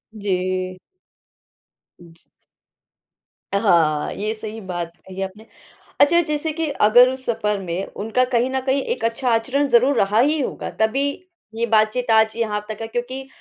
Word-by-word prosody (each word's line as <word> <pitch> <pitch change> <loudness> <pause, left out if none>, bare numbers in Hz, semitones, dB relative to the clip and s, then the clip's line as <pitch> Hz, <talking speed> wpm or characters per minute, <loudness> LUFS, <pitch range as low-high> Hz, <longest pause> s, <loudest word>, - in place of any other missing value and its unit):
जी। 185 -2 -2 1.2
जी। 165 -1 -17 1.3
अ, - - +3
हाँ, 165 -7 +2
ये 215 +2 -3
सही 220 0 -7
बात 175 -3 -5 0.2
कही 190 +1 -7
आपने। 195 +3 -6 0.6
अच्छा, 340 +4 +6
जैसे 305 0 -2
कि 325 0 -2
अगर 245 +4 +7
उस 260 0 -6
सफर 210 -3 -1
में 185 +1 -3 0.2
उनका 240 +3 +1
कहीं 240 +2 +2
न 265 0 -1
कहीं 270 +1 +1
एक 475 - -3
अच्छा 240 +2 -1
आचरण 265 +5 +1
ज़रूर 255 +3 +4
रहा 205 +1 +2
ही 300 +5 +3
होगा, - - -4
तभी 270 +6 +2 0.5
ये 235 +1 0
बातचीत 225 +2 +2
आज 220 0 +4
यहाँ 210 -2 -2
तक 215 +1 -6
है 225 - -4
क्योंकि 255 +3 -5
225 Hz, 155 wpm, -21 LUFS, 200-260 Hz, 1.3 s, अगर